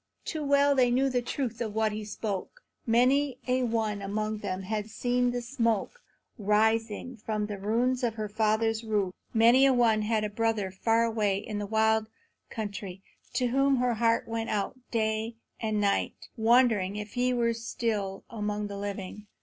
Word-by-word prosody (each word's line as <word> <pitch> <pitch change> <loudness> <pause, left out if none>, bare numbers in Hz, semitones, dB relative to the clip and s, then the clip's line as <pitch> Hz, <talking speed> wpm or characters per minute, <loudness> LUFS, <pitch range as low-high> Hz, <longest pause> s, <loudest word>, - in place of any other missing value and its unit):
Too 315 -2 -3
well 285 0 +4
they 255 -3 +4
knew 265 +2 +2
the 250 -1 +1
truth 240 -2 -3
of 215 -3 -3
what 220 -1 +2
he 215 +1 -4
spoke. 210 - -5 0.2
Many 255 +3 +3
a 255 +1 +2
one 225 -4 -1
among 215 +2 -2
them 185 -1 -4
had 210 +2 -3
seen 245 +2 +1
the 245 0 -3
smoke 235 - -1 0.4
rising 220 +3 +1
from 215 -1 -2
the 205 -1 -6
ruins 245 +5 0
of 230 -2 0
her 215 -1 -3
father's 220 +1 +1
roof. 205 -4 0 0.2
Many 235 +4 +5
a 270 - +4
one 230 -3 +3
had 215 0 0
a 210 - -1
brother 220 -3 0
far 225 +4 +2
away 215 -4 +1
in 210 +1 -5
the 205 - -4
wild 220 0 +2 0.4
country 200 -3 -6 0.3
to 245 0 +1
whom 275 +2 +3
her 250 -1 +1
heart 230 0 +1
went 225 0 -3
out 205 +2 -1 0.2
night 220 0 -1 0.2
and 215 -2 -1
day, 200 0 +1 0.2
wondering 225 -4 +3
if 210 0 -6
he 250 0 +1
were 235 -1 +1
still 220 -4 -3
among 210 -2 -3
the 200 -1 -6
living. 200 0 -6
220 Hz, 175 wpm, -28 LUFS, 210-240 Hz, 0.4 s, Many